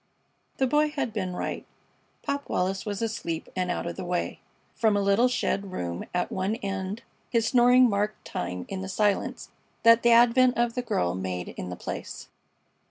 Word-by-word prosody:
The 265 - +2
Boy 295 +4 +3
had 280 -7 -3
been 185 -4 -3
right. - - -3 0.6
Pop 280 0 -3
Wallis 190 +3 -1
was 205 +1 -2
asleep 170 -8 -3
and 185 -1 -1
out 175 - -2
of 170 - -5
the - - -4
way. 175 0 -2 0.3
From 215 -3 +2
a - - +2
little 200 +5 +4
shed 200 -5 -1
room 85 - -4
at 180 0 -1
one 190 +3 -1
end 195 +1 -4 0.3
his 230 -2 +2
snoring 250 +1 +6
marked 210 0 -1
time 90 +1 -4
in 190 -1 -5
the 190 - -5
silence 205 0 0 0.3
that 230 0 +7
the 235 - +4
advent 245 +2 +5
of 240 0 +1
the 250 - -1
girl 90 - 0
made 90 -1 -4
in 90 - -6
the 90 - -5
place. - - -7
205 Hz, 180 wpm, -27 LUFS, 180-235 Hz, 0.6 s, that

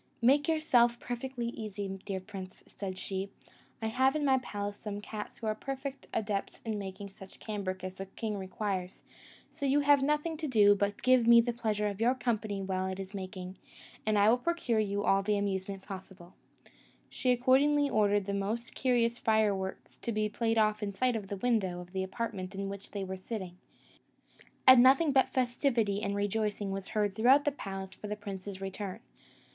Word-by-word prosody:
"Make 280 +5 +5
yourself 245 -7 +3
perfectly 245 0 -4
easy, 210 -3 -5 0.2
dear 195 -2 -2
prince," 185 0 -9
said 190 -1 -6
she; 190 +1 -4 0.5
"I - - +1
have 260 +4 +2
in 300 -1 0
my 265 -1 +4
palace 205 -4 -5
some 205 -1 -5
cats 210 0 -7
who 230 - -7
are 215 - +1
perfect 270 +4 -6
adepts 205 -2 -2
in 215 -2 -2
making 195 0 -7
such 190 0 -14
cambric 195 -4 -4
as 185 0 -4
the 195 +1 -7
king 215 +2 -4
requires; 190 -1 -4 0.5
so 285 -3 -3
you 285 +2 +3
have 285 -1 +5
nothing 300 +3 0
to 310 0 -3
do 210 -6 +6
but 200 0 0
to - - -16
give 255 -2 +5
me 235 0 +9
the 235 +1 +1
pleasure 215 -3 -1
of 205 +1 -4
your 245 +3 +4
company 215 -5 -2
while 190 0 -1
it 190 0 -4
is 195 +1 -7
making, 185 -1 -6 0.5
and 215 -1 +1
I 205 0 +5
will 240 +3 +5
procure 255 -7 0
you 205 -1 0
all 195 -1 +3
the 205 +1 +1
amusement 195 -1 -2
possible." 190 -2 -10 0.7
She 255 - 0
accordingly 275 +4 +4
ordered 205 -4 +2
the 200 - -2
most 215 +5 -2
curious 240 -2 +1
fire 220 -3 +3
works 190 0 -6
to 235 - -3
be 215 -1 +1
played 225 +2 0
off 215 0 +2
in 200 -1 -3
sight 250 +2 +1
of 210 -3 -4
the 200 - -4
window 190 -5 0
of 180 0 -10
the 190 - -1
apartment 190 -1 -4
in 195 0 -3
which 200 0 -8
they 200 -1 -4
were 190 0 -5
sitting; 185 -2 -6 1.1
and 260 -2 +10
nothing 275 +5 +6
but 265 -1 +4
festivity 240 -5 +1
and 200 -1 -1
rejoicing 205 0 -1
was 195 0 -4
heard 210 -2 0
throughout 255 +7 +5
the 290 - +3
palace 195 -7 -6
for 210 - -8
the 210 - -3
prince's 200 -1 -7
return. 195 +1 -5
210 Hz, 195 wpm, -31 LUFS, 195-240 Hz, 1.1 s, and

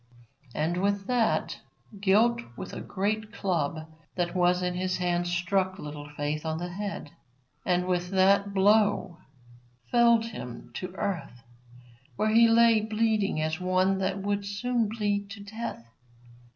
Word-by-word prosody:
And, 160 +3 0
with 200 +1 0
that, 240 -1 0 0.4
Guilt 220 +4 +3 0.2
with - - -7
a - - -5
great 215 +2 -2
club 165 -7 -2 0.3
that 175 -1 -1
was 180 0 +2
in 180 0 0
his 185 +1 -1
hand 175 -1 0
struck 185 +2 0
Little 150 -3 -8
Faith 150 +1 -3
on 160 -1 -2
the 175 +2 -4
head, 195 -5 -5 0.6
and 180 0 +2
with 180 -1 -1
that 195 +1 +3
blow 200 -3 +2 0.7
felled 235 -1 +5
him 120 - -8
to 185 - -4
the 185 0 -15
earth, 145 -11 -4 0.7
where 215 - +1
he 230 +1 +7
lay 230 -1 +5
bleeding 215 -4 0
as 155 +2 -2
one 185 +1 +1
that 190 0 -1
would 200 0 -1
soon 225 +3 -1
bleed 205 -2 -1
to 200 0 -9
death. 220 - -6
190 Hz, 145 wpm, -28 LUFS, 175-215 Hz, 0.7 s, he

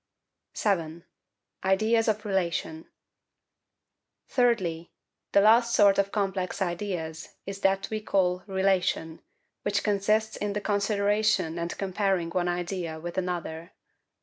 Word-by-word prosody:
7. 170 -5 -1 0.6
Ideas 220 +4 +2
of 215 0 0
Relation. 170 -4 -2 1.4
Thirdly, 185 -10 +1 0.4
the 200 - +5
last 230 +3 +5
sort 200 -1 +5
of 200 0 +1
complex 195 -2 -2
ideas 175 -3 -4
is 195 0 -6
that 195 0 +2
we 215 0 -2
call 180 -3 +1
RELATION, 190 -4 0 0.4
which 200 0 0
consists 215 +1 +1
in 205 -1 -2
the 210 - -2
consideration 205 -4 +1
and 170 0 -4
comparing 190 -3 0
one 175 0 0
idea 175 -2 -3
with 170 +2 -6
another. 175 -2 -4
195 Hz, 115 wpm, -27 LUFS, 175-205 Hz, 1.4 s, the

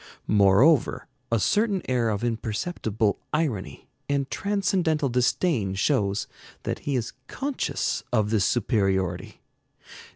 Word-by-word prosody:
Moreover, 105 +9 +4 0.3
a 115 - +3
certain 205 - +1
air 125 -3 +1
of 105 +1 -2
imperceptible 110 - -1
irony 115 - -2 0.2
and 140 -1 0
transcendental 185 -7 0
disdain 125 - +1
shows 100 -2 +1 0.4
that - - -3
he 140 - +1
is 120 -2 -2
conscious 275 -1 -2
of 110 -3 +1
this 110 -3 +2
superiority. 95 -6 0
120 Hz, 105 wpm, -25 LUFS, 100-155 Hz, 0.4 s, Moreover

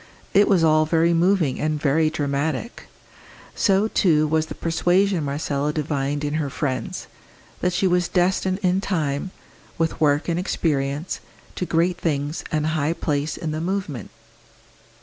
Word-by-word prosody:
It 205 +1 +5
was 185 -5 +3
all 155 -1 +4
very 165 +1 +3
moving 170 -5 +2
and 155 0 -1
very 155 +2 +2
dramatic; 145 - -3 0.7
so, 200 +1 +2
too, 160 -8 +3
was 155 +1 +1
the - - -7
persuasion 175 +2 +1
Marcella 145 0 -1
divined 145 -1 -2
in 145 0 -2
her 145 - -2
friends, 135 -1 -3 0.5
that 180 - +1
she 185 - 0
was 180 -1 +2
destined 185 +1 +1
in 185 +1 +2
time, 155 -4 -1 0.5
with 165 -1 -1
work 145 0 +2
and 170 0 0
experience, 150 -3 -1 0.3
to 180 - -3
great 175 +2 +1
things 150 -1 -1
and 155 -1 0
high 155 0 0
place 150 -2 -2
in 160 - -3
the 155 +1 -3
movement. 175 - -3
160 Hz, 150 wpm, -23 LUFS, 145-180 Hz, 0.7 s, It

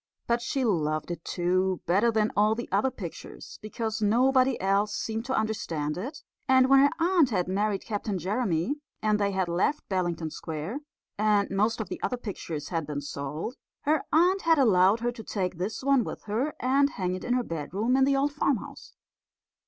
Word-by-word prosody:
But 235 0 +1
she 260 +2 -1
loved 155 -6 0
it 170 -1 -6
too, 185 +1 0
better 200 +7 +3
than 215 -1 +1
all 210 +2 +3
the 240 - -5
other 265 - +2
pictures, 185 -9 -9
because 220 0 -4
nobody 255 +4 +3
else 200 +2 +1
seemed 225 +1 -3
to 265 - -1
understand 170 -9 -2
it; 275 - -6 0.2
and 260 -1 +5
when 270 0 +7
her 280 +1 +6
aunt 340 -4 +4
had 185 -6 0
married 200 +1 0
Captain 205 -2 -2
Jeremy, 195 - -1 0.3
and 215 -1 +2
they 200 -1 +2
had 190 -2 -1
left 185 - 0
Bellington 175 -4 -1
Square, 160 - -5 0.4
and 210 -1 +2
most 215 +4 +1
of 220 - -3
the - - -6
other 250 - -1
pictures 170 -9 -6
had 165 -4 -2
been 145 -1 -3
sold, 145 - -5 0.3
her 300 0 +2
aunt 360 +5 +4
had 330 -1 +4
allowed 210 -4 +4
her 240 0 0
to 235 -2 -10
take 185 -5 -3
this 200 +7 -3
one 275 -2 +3
with - - -7
her 240 +8 -2
and 275 +3 +3
hang 185 -8 -2
it 185 - -5
in 245 - 0
her 250 - +1
bedroom 195 - -1
in 265 - +4
the 275 +1 +3
old 285 +1 +1
farmhouse. 280 -5 -2
215 Hz, 190 wpm, -27 LUFS, 180-255 Hz, 0.4 s, when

